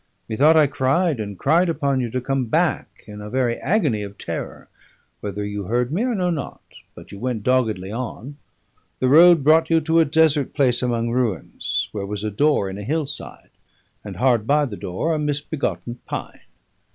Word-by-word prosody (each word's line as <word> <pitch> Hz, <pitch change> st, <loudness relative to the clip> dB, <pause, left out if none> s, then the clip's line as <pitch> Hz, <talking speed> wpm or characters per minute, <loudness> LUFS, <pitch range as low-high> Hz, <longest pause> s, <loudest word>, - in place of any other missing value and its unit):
Methought 145 Hz, +8 st, +4 dB
I 155 Hz, -, +6 dB
cried 140 Hz, +2 st, 0 dB
and 100 Hz, -2 st, -5 dB
cried 170 Hz, -, +2 dB
upon 140 Hz, -4 st, 0 dB
you 120 Hz, -2 st, -2 dB
to 130 Hz, -, -2 dB
come 135 Hz, +1 st, -1 dB
back 110 Hz, -, -1 dB
in 105 Hz, 0 st, -10 dB
a 105 Hz, -, -7 dB
very 125 Hz, -1 st, 0 dB
agony 150 Hz, -, +1 dB
of 100 Hz, 0 st, -8 dB
terror; -, -, -6 dB, 0.5 s
whether 105 Hz, 0 st, -4 dB
you 105 Hz, -1 st, -4 dB
heard 120 Hz, +5 st, 0 dB
me 185 Hz, +9 st, 0 dB
I 250 Hz, -2 st, 0 dB
know 180 Hz, -2 st, 0 dB
not, 150 Hz, -5 st, -5 dB, 0.3 s
but -, -, -13 dB
you 100 Hz, -, -9 dB
went 120 Hz, -2 st, -3 dB
doggedly 110 Hz, -7 st, 0 dB
on. 125 Hz, +4 st, -6 dB, 0.6 s
The 130 Hz, -, +2 dB
road 165 Hz, +1 st, +7 dB
brought 160 Hz, +2 st, +4 dB
you 165 Hz, -1 st, +4 dB
to 165 Hz, +2 st, +2 dB
a 165 Hz, -, +5 dB
desert 150 Hz, -2 st, +2 dB
place 130 Hz, -4 st, +2 dB
among 120 Hz, -2 st, -1 dB
ruins, 120 Hz, -8 st, -2 dB
where 100 Hz, -2 st, -5 dB
was 105 Hz, 0 st, -5 dB
a 110 Hz, -, -2 dB
door 140 Hz, -1 st, +2 dB
in 95 Hz, +1 st, -6 dB
a -, -, -6 dB
hill 155 Hz, +7 st, -1 dB
side, 140 Hz, -, -7 dB, 0.5 s
and -, -, -8 dB
hard 120 Hz, -4 st, +2 dB
by 150 Hz, +1 st, +3 dB
the 115 Hz, -7 st, -6 dB
door 100 Hz, -, -2 dB
a 155 Hz, -, -1 dB
misbegotten 145 Hz, -4 st, -3 dB
pine. -, -, -6 dB
130 Hz, 190 wpm, -22 LUFS, 110-155 Hz, 0.6 s, road